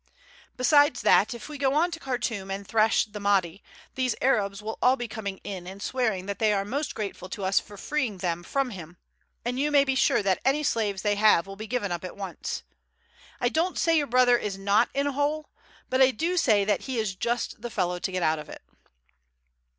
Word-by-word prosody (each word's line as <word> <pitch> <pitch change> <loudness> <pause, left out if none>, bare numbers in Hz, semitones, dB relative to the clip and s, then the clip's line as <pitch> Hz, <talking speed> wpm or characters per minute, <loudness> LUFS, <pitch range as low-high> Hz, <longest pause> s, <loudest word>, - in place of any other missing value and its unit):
Besides 285 +1 +4
that, 215 +4 +4
if 235 - -9
we 300 -2 -8
go 275 0 +1
on 340 +4 +2
to 330 - -6
Khartoum 235 -8 -3
and 195 0 -5
thrash 220 0 +3
the 210 -1 -9
Mahdi, 195 -3 +1 0.3
these 255 -3 0
Arabs 205 -6 +1
will 215 +1 -6
all 255 +1 +5
be 240 -2 -5
coming 200 -3 -5
in 185 -3 -6
and 190 +2 -8
swearing 220 -5 -1
that 200 -1 -5
they 220 -1 +3
are 195 -1 0
most 280 +8 -3
grateful 200 -3 -5
to 200 +1 -6
us 190 +1 +3
for 205 0 -13
freeing 245 -5 -2
them 175 -2 -2
from 265 +8 -1
him, 175 -3 -10 0.5
and 250 +2 -2
you 295 +2 +1
may 285 -1 +5
be 270 -1 0
sure 260 -5 +2
that 190 -2 +1
any 280 +3 +2
slaves 210 -8 -1
they 205 -1 +1
have 210 -5 +5
will 195 0 -9
be 215 +2 -7
given 225 -5 -2
up 175 0 -3
at 185 - -7
once. 195 -2 -5 0.8
I 245 - +2
don't 335 +6 0
say 330 -1 +3
your 295 -2 +2
brother 245 -1 +4
is 200 -2 -4
not 200 +4 +2
in 280 +1 +1
a 285 - 0
hole; 290 +2 -1 0.4
but 260 +1 +1
I 260 - +7
do 330 +9 -1
say 215 - +3
that 205 -1 +1
he 260 -2 -3
is 215 -3 -1
just 235 +3 -2
the 240 - -5
fellow 180 -4 -1
to 190 - -3
get 185 -1 -2
out 155 -1 +2
of 150 - -10
it." - - -10
220 Hz, 225 wpm, -26 LUFS, 195-265 Hz, 0.8 s, I